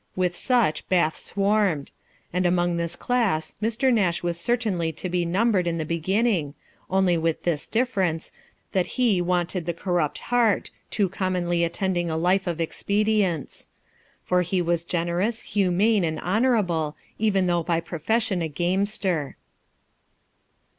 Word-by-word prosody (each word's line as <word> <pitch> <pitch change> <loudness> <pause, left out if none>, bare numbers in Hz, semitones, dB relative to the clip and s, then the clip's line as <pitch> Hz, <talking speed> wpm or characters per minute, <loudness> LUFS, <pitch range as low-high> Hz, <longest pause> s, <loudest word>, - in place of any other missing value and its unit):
With 180 -1 0
such 235 -9 +1
Bath 170 -4 +2
swarmed; 200 -7 0 0.4
and 180 0 +2
among 175 -1 +1
this 170 0 -2
class 200 -10 0
Mr. 230 +4 +2
Nash 185 -7 +1
was 170 -1 -2
certainly 200 -6 0
to 180 +4 -5
be 175 -1 0
numbered 190 0 +2
in 170 -1 -1
the 160 - -2
beginning, 170 -1 0 0.3
only 185 -3 +2
with 165 0 -1
this 165 -4 -1
difference, 195 -9 0 0.4
that 185 -2 +1
he 225 -8 +3
wanted 175 0 -1
the 170 - -1
corrupt 175 -4 -1 0.2
heart, 230 -5 +2 0.2
too 205 -3 +1
commonly 180 -2 -1
attending 175 0 -1
a 160 - -1
life 180 +3 +2
of 170 -1 -2
expedients; 200 -1 0 0.6
for 180 0 +2
he 180 +1 0
was 170 -1 0
generous, 175 +6 -1
humane, 200 +1 +2
and 160 -2 -1
honourable, 180 -8 +1 0.2
even 200 -3 +2
though 175 -1 +1
by 165 0 0
profession 185 +4 -1
a 165 - 0
gamester. 180 -1 -1
180 Hz, 140 wpm, -25 LUFS, 170-205 Hz, 0.6 s, he